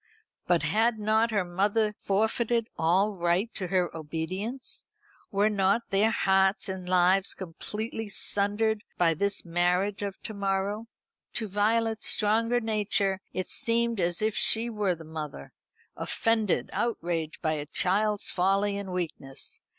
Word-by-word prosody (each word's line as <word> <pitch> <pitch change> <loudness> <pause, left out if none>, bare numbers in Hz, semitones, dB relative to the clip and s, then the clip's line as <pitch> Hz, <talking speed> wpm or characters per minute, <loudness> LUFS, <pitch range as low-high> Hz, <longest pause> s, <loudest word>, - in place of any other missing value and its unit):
But 170 -4 +3
had 220 +9 +2
not 220 +2 +2
her 205 -4 0
mother 205 +4 +1
forfeited 220 +3 0
all 185 +6 +2
right 180 +4 0
to 185 - -1
her 180 -1 0
obedience? 180 - -4 0.5
Were 205 +1 +2
not 200 +2 +1
their 200 +3 +3
hearts 195 -2 +2
and 190 -1 -5
lives 185 +2 +4
completely 210 +5 -5
sundered 205 +2 0
by 170 -2 +4
this 200 +5 -1
marriage 180 +4 +1
of 200 -1 -4
to 220 - -4
morrow? 200 +2 -1 0.5
To 225 -2 -2
Violet's 220 +3 +1
stronger 230 +3 +2
nature 205 -3 0
it 185 - -3
seemed 235 -1 +1
as 175 +2 0
if 215 -1 +1
she 230 +1 +3
were 205 -4 0
the 165 - -11
mother 155 - -7 0.4
offended, 225 -4 0
outraged 170 -8 -2
by 155 - +1
a 150 -1 -4
child's 205 +5 +1
folly 195 +2 +1
and 200 -2 -5
weakness. 160 -7 -4
200 Hz, 135 wpm, -28 LUFS, 180-220 Hz, 0.5 s, lives